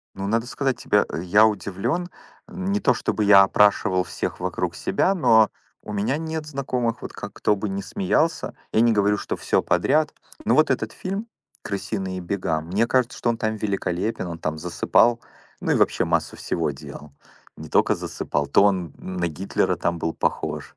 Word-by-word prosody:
Ну, 95 Hz, 0 st, -4 dB
надо 115 Hz, +3 st, 0 dB
сказать 135 Hz, 0 st, -1 dB
тебе, -, -, +2 dB, 0.2 s
я 105 Hz, +5 st, +5 dB
удивлен. 110 Hz, -, -2 dB, 0.4 s
Не 195 Hz, +2 st, -2 dB
то 140 Hz, -10 st, +4 dB
чтобы 110 Hz, -2 st, -1 dB
я 100 Hz, -1 st, +8 dB
опрашивал 100 Hz, -1 st, +3 dB
всех -, -, -4 dB
вокруг -, -, -2 dB
себя, 195 Hz, -, +1 dB
но 115 Hz, -, +5 dB, 0.3 s
у 105 Hz, -, -7 dB
меня 105 Hz, +7 st, 0 dB
нет 160 Hz, -1 st, -4 dB
знакомых, 130 Hz, -5 st, -2 dB
вот -, -, -6 dB
как 100 Hz, -, -8 dB
кто 105 Hz, 0 st, +1 dB
бы 105 Hz, +2 st, -3 dB
ни 95 Hz, 0 st, -3 dB
смеялся. 165 Hz, -, 0 dB, 0.2 s
Я 110 Hz, -, +3 dB
не 115 Hz, -1 st, +4 dB
говорю, 105 Hz, 0 st, +2 dB
что -, -, -4 dB
всё -, -, +1 dB
подряд. 155 Hz, -1 st, +2 dB, 0.3 s
Но -, -, +3 dB
вот 155 Hz, -2 st, +4 dB
этот 115 Hz, -4 st, -1 dB
фильм 195 Hz, +4 st, -4 dB, 0.4 s
"Крысиные 95 Hz, -2 st, -4 dB
бега", 85 Hz, -3 st, -2 dB
мне 95 Hz, +8 st, 0 dB
кажется, 125 Hz, 0 st, +1 dB
что 120 Hz, -, +1 dB
он 115 Hz, -, -1 dB
там 110 Hz, -1 st, -2 dB
великолепен, 100 Hz, -1 st, -2 dB
он 85 Hz, -1 st, -6 dB
там 80 Hz, -1 st, -3 dB
засыпал, 115 Hz, +7 st, +2 dB, 0.4 s
ну -, -, 0 dB
и -, -, +3 dB
вообще -, -, +2 dB
массу -, -, -1 dB
всего 80 Hz, -3 st, -1 dB
делал. 70 Hz, +1 st, -11 dB, 0.4 s
Не -, -, -9 dB
тока -, -, +3 dB
засыпал, 75 Hz, 0 st, -3 dB
то 100 Hz, -, +4 dB
он 90 Hz, -6 st, +1 dB
на 90 Hz, -2 st, -3 dB
Гитлера 90 Hz, +5 st, -1 dB
там 85 Hz, 0 st, -1 dB
был 80 Hz, 0 st, -2 dB
похож. -, -, -3 dB
105 Hz, 180 wpm, -23 LUFS, 95-125 Hz, 0.4 s, я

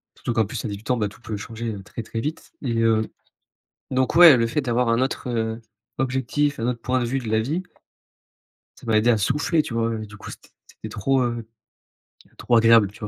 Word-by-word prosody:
Surtout 120 Hz, -, -3 dB
qu'en 110 Hz, -1 st, +2 dB
plus, 110 Hz, +3 st, -5 dB
à -, -, -1 dB
18 105 Hz, +3 st, -7 dB
ans, 125 Hz, -, +2 dB
bah, 105 Hz, -, 0 dB
tout 100 Hz, -, -14 dB
peut 110 Hz, -3 st, -5 dB
changer, 115 Hz, +2 st, -5 dB
heu, 100 Hz, -, -8 dB
très 105 Hz, +3 st, -7 dB
très 115 Hz, +1 st, -5 dB
vite. 150 Hz, +7 st, -5 dB
Et 120 Hz, -5 st, -2 dB
heu, 110 Hz, -1 st, +2 dB, 0.8 s
donc 130 Hz, 0 st, 0 dB
ouais, 170 Hz, -6 st, +10 dB
le 115 Hz, -, +2 dB
fait 130 Hz, +6 st, -1 dB
d'avoir 120 Hz, -1 st, 0 dB
un 115 Hz, +1 st, +2 dB
autre, 130 Hz, 0 st, -2 dB
heu, 115 Hz, -1 st, -2 dB, 0.4 s
objectif, 135 Hz, +3 st, 0 dB
un 115 Hz, -, -1 dB
autre 120 Hz, -2 st, -2 dB
point 130 Hz, +2 st, 0 dB
de -, -, 0 dB
vue 130 Hz, +3 st, -1 dB
de 120 Hz, -4 st, -6 dB
la 110 Hz, 0 st, +2 dB
vie, 155 Hz, +11 st, -2 dB, 1.2 s
ça -, -, -14 dB
m'a 110 Hz, -1 st, +3 dB
aidé 115 Hz, +3 st, +3 dB
à 115 Hz, -, +4 dB
souffler, 145 Hz, -, +1 dB
tu 120 Hz, -, -7 dB
vois, 115 Hz, 0 st, 0 dB
et -, -, -6 dB
du 105 Hz, -1 st, -13 dB
coup, -, -, -9 dB
c'était -, -, -13 dB, 0.2 s
c'était -, -, -10 dB
trop, 135 Hz, +6 st, +1 dB
heu, 120 Hz, -2 st, -3 dB, 0.9 s
trop 120 Hz, -, +1 dB
agréable, 115 Hz, -3 st, +6 dB
tu -, -, -16 dB
vois, 105 Hz, -, -5 dB
115 Hz, 235 wpm, -23 LUFS, 110-130 Hz, 1.2 s, ouais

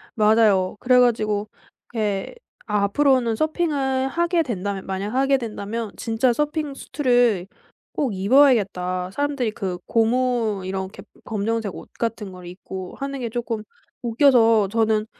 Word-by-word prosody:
맞아요. 210 Hz, -4 st, +3 dB
그래 250 Hz, 0 st, +4 dB
가지고 215 Hz, -4 st, +1 dB, 0.5 s
예 205 Hz, -3 st, -1 dB, 0.3 s
'앞으로는 230 Hz, +4 st, +2 dB
서핑을 280 Hz, -3 st, 0 dB
하게 340 Hz, +2 st, +1 dB
된다면 200 Hz, -6 st, -4 dB
만약 195 Hz, +3 st, -4 dB
하게 270 Hz, +1 st, +3 dB
된다면 225 Hz, -1 st, -5 dB
진짜 235 Hz, +2 st, +1 dB
서핑 295 Hz, +2 st, -2 dB
슈트를 245 Hz, -, +1 dB, 0.5 s
꼭 265 Hz, -7 st, -1 dB
입어야겠다.' 190 Hz, -6 st, +3 dB
사람들이 280 Hz, -2 st, -1 dB
그 190 Hz, -4 st, -4 dB
고무 230 Hz, -3 st, +1 dB
이렇게 190 Hz, +1 st, -5 dB, 0.2 s
검정색 220 Hz, -1 st, -2 dB
옷 -, -, -10 dB
같은 225 Hz, -4 st, -3 dB
걸 180 Hz, -1 st, -11 dB
입고 185 Hz, +1 st, -8 dB
하는 275 Hz, 0 st, -4 dB
게 235 Hz, -2 st, -3 dB
쪼끔 230 Hz, -2 st, -3 dB, 0.4 s
웃겨서 230 Hz, -4 st, +4 dB
저는 220 Hz, 0 st, +1 dB
225 Hz, 275 characters per minute, -22 LUFS, 200-260 Hz, 0.5 s, 그래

